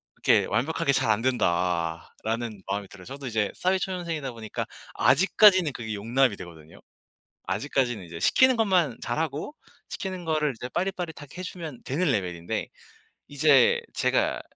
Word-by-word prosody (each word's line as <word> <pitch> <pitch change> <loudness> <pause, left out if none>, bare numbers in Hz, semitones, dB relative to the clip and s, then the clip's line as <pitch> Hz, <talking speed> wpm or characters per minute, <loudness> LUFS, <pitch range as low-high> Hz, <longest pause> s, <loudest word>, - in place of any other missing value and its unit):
이렇게 - - +3
완벽하게 140 +6 0
잘 130 -3 +1
안 105 +1 +1
된다.'라는 95 +1 -1
마음이 100 0 -3
들어요. 95 -2 -13
저도 135 +1 -7
이제 110 -3 0
사회 185 +1 +1
초년생이다 170 -8 -3
보니까 110 -2 -5 0.3
아직까지는 185 +3 +5
그게 110 -3 -5
용납이 115 +3 +1
되거든요. 80 -3 -12 0.7
아직까지는 115 +1 -1
이제 85 -1 -8
시키는 260 - +4
것만 185 - +2
잘하고 150 - -3 0.4
시키는 185 -2 -5
거를 155 -3 +1
이제 125 - -5
빠릿빠릿하게 175 -3 -4
해 - - -4
주면 165 -8 -7
되는 150 +3 0
레벨인데 90 -6 -2 0.6
이제 160 - +4
제가 - - +1
135 Hz, 365 characters per minute, -26 LUFS, 105-170 Hz, 0.7 s, 아직까지는